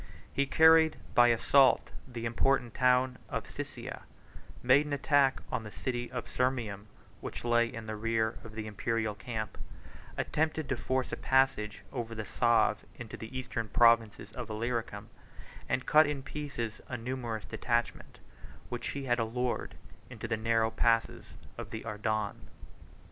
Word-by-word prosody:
He 140 Hz, 0 st, +1 dB
carried 160 Hz, +2 st, +6 dB, 0.2 s
by 120 Hz, 0 st, +7 dB
assault 130 Hz, +3 st, +4 dB, 0.2 s
the 120 Hz, -2 st, -6 dB
important 120 Hz, +1 st, +1 dB
town 125 Hz, 0 st, +3 dB
of -, -, -3 dB
Siscia; -, -, -7 dB, 0.6 s
made 135 Hz, +4 st, +5 dB
an 145 Hz, -, -3 dB
attack 140 Hz, -1 st, +3 dB
on -, -, -1 dB
the 105 Hz, -, -8 dB
city 120 Hz, +1 st, -3 dB
of 125 Hz, -2 st, -4 dB
Sirmium, 115 Hz, -6 st, -1 dB, 0.3 s
which -, -, -7 dB
lay 120 Hz, 0 st, +3 dB
in 115 Hz, -1 st, -7 dB
the 110 Hz, 0 st, -4 dB
rear 110 Hz, +1 st, 0 dB
of 110 Hz, -1 st, -11 dB
the 110 Hz, -1 st, -4 dB
Imperial 110 Hz, +1 st, -1 dB
camp, 110 Hz, +1 st, -5 dB, 0.6 s
attempted 155 Hz, -1 st, -1 dB
to 130 Hz, -, +1 dB
force 130 Hz, +1 st, -1 dB
a -, -, -1 dB
passage 130 Hz, -6 st, +1 dB
over 115 Hz, -3 st, -4 dB
the 110 Hz, -1 st, -4 dB
Save 120 Hz, -3 st, +2 dB
into 120 Hz, -2 st, -8 dB
the 110 Hz, +4 st, -7 dB
eastern 120 Hz, -3 st, -3 dB
provinces 115 Hz, -2 st, +3 dB
of 120 Hz, -1 st, -6 dB
Illyricum; 110 Hz, -2 st, -3 dB, 0.6 s
and 125 Hz, 0 st, 0 dB
cut 155 Hz, -1 st, +6 dB
in 145 Hz, -2 st, -3 dB
pieces 130 Hz, -6 st, -5 dB
a 120 Hz, -, -3 dB
numerous 120 Hz, -2 st, -4 dB
detachment, 120 Hz, -1 st, -2 dB, 0.5 s
which -, -, -4 dB
he 140 Hz, -, -4 dB
had 120 Hz, -2 st, +1 dB
allured 120 Hz, +2 st, -2 dB, 0.3 s
into -, -, -6 dB
the 110 Hz, -, 0 dB
narrow 115 Hz, 0 st, +1 dB
passes 115 Hz, 0 st, 0 dB, 0.2 s
of -, -, -6 dB
Adarne. 110 Hz, -1 st, -3 dB
120 Hz, 150 wpm, -31 LUFS, 110-130 Hz, 0.6 s, by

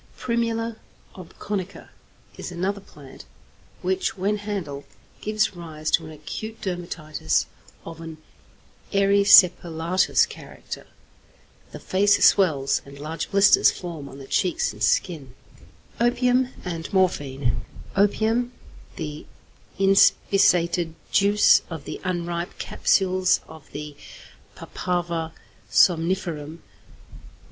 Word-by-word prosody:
=Primula 230 Hz, -1 st, -2 dB, 0.4 s
obconica= 190 Hz, +1 st, -6 dB, 0.5 s
is -, -, -7 dB
another 190 Hz, +3 st, -2 dB
plant 145 Hz, -7 st, -14 dB, 0.6 s
which, 375 Hz, -, -1 dB
when 200 Hz, +3 st, 0 dB
handled, 190 Hz, -9 st, -5 dB, 0.4 s
gives 215 Hz, -2 st, 0 dB
rise 155 Hz, -3 st, -5 dB
to 165 Hz, -, +3 dB
an -, -, -10 dB
acute 215 Hz, +9 st, -7 dB
dermatitis 170 Hz, -, -2 dB, 0.4 s
of 165 Hz, 0 st, -9 dB
an 165 Hz, -1 st, -8 dB, 0.7 s
erysipelatous 185 Hz, -3 st, +4 dB
character. -, -, -10 dB, 0.8 s
The -, -, -9 dB
face 200 Hz, +2 st, +3 dB
swells, 155 Hz, -9 st, +3 dB
and 140 Hz, 0 st, -13 dB
large 155 Hz, +2 st, -5 dB
blisters 200 Hz, 0 st, +6 dB
form 165 Hz, -6 st, -7 dB
on 135 Hz, -, -11 dB
the 135 Hz, -, -10 dB
cheeks 175 Hz, -, 0 dB
and 105 Hz, -, -14 dB
chin. 135 Hz, -, 0 dB, 0.6 s
XXIX. 235 Hz, -, +4 dB
OPIUM 250 Hz, +1 st, +2 dB, 0.2 s
AND 165 Hz, -2 st, -5 dB
MORPHINE 140 Hz, -, 0 dB, 0.3 s
=Opium.= 220 Hz, +4 st, +1 dB, 0.4 s
The 150 Hz, -3 st, -6 dB, 0.5 s
inspissated 180 Hz, -3 st, +3 dB, 0.2 s
juice 205 Hz, +1 st, +5 dB
of 160 Hz, -4 st, -7 dB
the -, -, -7 dB
unripe 175 Hz, 0 st, -3 dB
capsules 185 Hz, -1 st, +1 dB
of 160 Hz, -2 st, -14 dB
the 150 Hz, 0 st, -7 dB, 0.6 s
Papaver 170 Hz, -2 st, -3 dB, 0.4 s
somniferum. 165 Hz, -3 st, +1 dB
175 Hz, 100 wpm, -24 LUFS, 160-200 Hz, 0.8 s, blisters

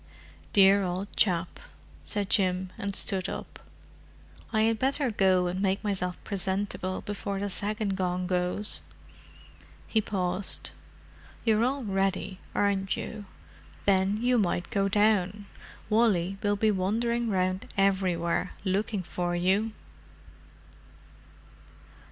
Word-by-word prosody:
"Dear 195 Hz, 0 st, +6 dB
old 185 Hz, +2 st, -3 dB
chap," 175 Hz, -3 st, +1 dB, 0.4 s
said 205 Hz, -2 st, 0 dB
Jim, 185 Hz, -2 st, +1 dB
and 200 Hz, -1 st, -3 dB
stood 190 Hz, -3 st, +1 dB
up. -, -, -7 dB, 0.9 s
"I 220 Hz, -1 st, +2 dB
had 225 Hz, 0 st, +2 dB
better 270 Hz, -1 st, +1 dB
go 190 Hz, -3 st, +3 dB
and 180 Hz, +2 st, -2 dB
make 195 Hz, +1 st, 0 dB
myself 185 Hz, -3 st, -2 dB
presentable 190 Hz, -1 st, -1 dB
before 200 Hz, -1 st, -4 dB
the 200 Hz, 0 st, -3 dB
second 205 Hz, +1 st, 0 dB
gong 180 Hz, -1 st, -1 dB
goes." 180 Hz, +3 st, 0 dB, 1.0 s
He 220 Hz, -, +1 dB
paused. 185 Hz, -2 st, 0 dB, 0.7 s
"You're 220 Hz, -1 st, +3 dB
all 265 Hz, +2 st, 0 dB
ready 195 Hz, -2 st, -1 dB, 0.2 s
aren't 195 Hz, -1 st, +1 dB
you? 215 Hz, -2 st, -6 dB, 0.6 s
Then 195 Hz, +1 st, +3 dB
you 245 Hz, +1 st, +3 dB
might 175 Hz, -3 st, -1 dB
go 195 Hz, 0 st, +1 dB
down. 205 Hz, -1 st, +2 dB, 0.4 s
Wally 195 Hz, -4 st, +2 dB
will 205 Hz, 0 st, +1 dB
be 215 Hz, +1 st, +2 dB
wandering 230 Hz, +5 st, 0 dB
round 185 Hz, -1 st, 0 dB
everywhere, 185 Hz, -3 st, +1 dB
looking 195 Hz, +1 st, 0 dB
for 175 Hz, 0 st, -2 dB
you." 190 Hz, +5 st, +1 dB
195 Hz, 115 wpm, -28 LUFS, 185-210 Hz, 1.0 s, Dear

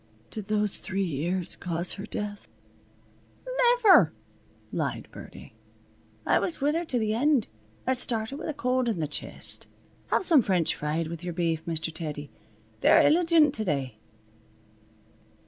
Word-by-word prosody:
Did 215 Hz, -3 st, -6 dB
those 210 Hz, -1 st, 0 dB
three 195 Hz, 0 st, -2 dB
years 175 Hz, +2 st, -2 dB
cause 175 Hz, 0 st, -1 dB
her 200 Hz, +1 st, -7 dB
death?" 210 Hz, -2 st, -5 dB, 1.0 s
"Niver!" -, -, +5 dB, 0.6 s
lied -, -, -3 dB
Birdie. -, -, -12 dB, 0.7 s
"I -, -, +3 dB
was 340 Hz, -, -2 dB
with 290 Hz, +1 st, +1 dB
her 335 Hz, +2 st, 0 dB
to 255 Hz, -, -1 dB
the 215 Hz, -2 st, 0 dB
end. 270 Hz, 0 st, +2 dB, 0.4 s
It 260 Hz, 0 st, +2 dB
started 230 Hz, +2 st, 0 dB
with -, -, -5 dB
a -, -, -2 dB
cold 255 Hz, -2 st, 0 dB
on 210 Hz, -7 st, -2 dB
th' 150 Hz, -2 st, -2 dB
chest. -, -, -7 dB, 0.4 s
Have -, -, +1 dB
some 325 Hz, -7 st, +6 dB
French 185 Hz, -6 st, +1 dB
fried 155 Hz, +2 st, -2 dB
with 170 Hz, +1 st, -7 dB
yer 175 Hz, -1 st, -4 dB
beef, 165 Hz, -2 st, -1 dB
Mr. 165 Hz, -1 st, -2 dB
Teddy. 150 Hz, -3 st, -5 dB, 0.5 s
They're -, -, +6 dB
illigent 325 Hz, -2 st, +4 dB
to 220 Hz, -, -1 dB
day." 135 Hz, -, -2 dB
210 Hz, 145 wpm, -27 LUFS, 165-275 Hz, 1.0 s, some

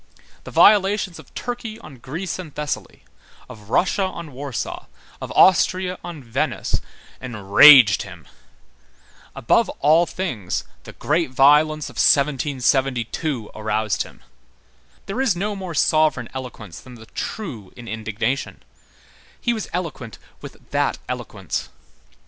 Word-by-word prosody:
The -, -, -7 dB
violations 200 Hz, -3 st, +4 dB
of -, -, -15 dB
Turkey 235 Hz, -3 st, -5 dB
on 155 Hz, -, -13 dB
Greece 165 Hz, +11 st, -5 dB
and 170 Hz, -5 st, -8 dB
Thessaly, 150 Hz, -1 st, -5 dB, 0.4 s
of 110 Hz, -4 st, -13 dB
Russia 185 Hz, -, +1 dB
on 170 Hz, -5 st, -4 dB
Warsaw, 135 Hz, -1 st, -5 dB, 0.3 s
of -, -, -6 dB
Austria 185 Hz, 0 st, +3 dB
on 165 Hz, -5 st, -8 dB
Venice, 115 Hz, -2 st, -2 dB, 0.4 s
enraged 110 Hz, 0 st, +7 dB
him. -, -, -11 dB, 1.1 s
Above -, -, +2 dB
all 160 Hz, +4 st, +4 dB
things, 125 Hz, -, -3 dB, 0.2 s
the -, -, -10 dB
great 160 Hz, 0 st, 0 dB
violence 150 Hz, +4 st, +4 dB
of -, -, -12 dB
1772 135 Hz, -2 st, +1 dB
aroused 110 Hz, 0 st, -1 dB
him. -, -, -8 dB, 0.8 s
There 215 Hz, +7 st, -3 dB
is 250 Hz, -9 st, +2 dB
no 205 Hz, +4 st, -2 dB
more 185 Hz, -4 st, -6 dB
sovereign 150 Hz, -6 st, +2 dB
eloquence 120 Hz, -9 st, -8 dB
than 125 Hz, -1 st, -13 dB
the 110 Hz, -1 st, -13 dB
true 120 Hz, -, -6 dB
in 120 Hz, -, -10 dB
indignation; 115 Hz, +4 st, -3 dB, 0.8 s
he 240 Hz, -, 0 dB
was 220 Hz, -3 st, -5 dB
eloquent 155 Hz, -, -5 dB, 0.2 s
with -, -, -10 dB
that -, -, 0 dB
eloquence. -, -, -5 dB
145 Hz, 120 wpm, -21 LUFS, 120-180 Hz, 1.1 s, enraged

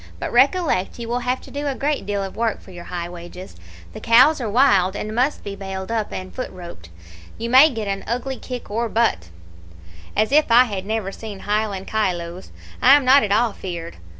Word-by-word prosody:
But -, -, -5 dB
recollect 330 Hz, -, +2 dB
you 235 Hz, -1 st, -6 dB
will 240 Hz, +1 st, -1 dB
have 250 Hz, +1 st, -2 dB
to -, -, -14 dB
do 285 Hz, +1 st, -4 dB
a 275 Hz, -, -2 dB
great 285 Hz, -7 st, -2 dB
deal 200 Hz, -1 st, -1 dB
of 195 Hz, -, -7 dB
work 225 Hz, -1 st, -1 dB
for 190 Hz, -, -15 dB
your 175 Hz, -1 st, -10 dB
high 175 Hz, -1 st, -5 dB
wages. 175 Hz, +1 st, -10 dB, 0.4 s
The -, -, -8 dB
cows 255 Hz, +6 st, +5 dB
are 230 Hz, -, -2 dB
wild, 205 Hz, -6 st, +3 dB
and 215 Hz, +1 st, -4 dB
must 255 Hz, +6 st, 0 dB
be 200 Hz, -1 st, -6 dB
bailed 190 Hz, +1 st, -6 dB
up 220 Hz, -2 st, -2 dB
and 185 Hz, 0 st, -7 dB
foot 255 Hz, -, -5 dB
roped. 170 Hz, -, -11 dB, 0.5 s
You 230 Hz, +1 st, -4 dB
may 270 Hz, +5 st, +8 dB
get 225 Hz, -6 st, -5 dB
an 195 Hz, 0 st, -3 dB
ugly 250 Hz, +3 st, -3 dB
kick 250 Hz, -4 st, -8 dB
or 230 Hz, +2 st, -1 dB
butt' 220 Hz, -, 0 dB, 0.9 s
"'As 215 Hz, +3 st, +2 dB
if 300 Hz, 0 st, +4 dB
I 240 Hz, +2 st, +8 dB
had 200 Hz, -5 st, -5 dB
never 215 Hz, -3 st, -2 dB
seen 205 Hz, -2 st, -9 dB
Highland 205 Hz, -2 st, -2 dB
kyloes! 180 Hz, -4 st, -3 dB, 0.3 s
I 265 Hz, +3 st, +8 dB
am 290 Hz, -2 st, +2 dB
not 270 Hz, +2 st, +7 dB
at 205 Hz, -, -2 dB
all 220 Hz, +1 st, +2 dB
feared. 170 Hz, -3 st, -7 dB
215 Hz, 210 wpm, -21 LUFS, 190-250 Hz, 0.9 s, may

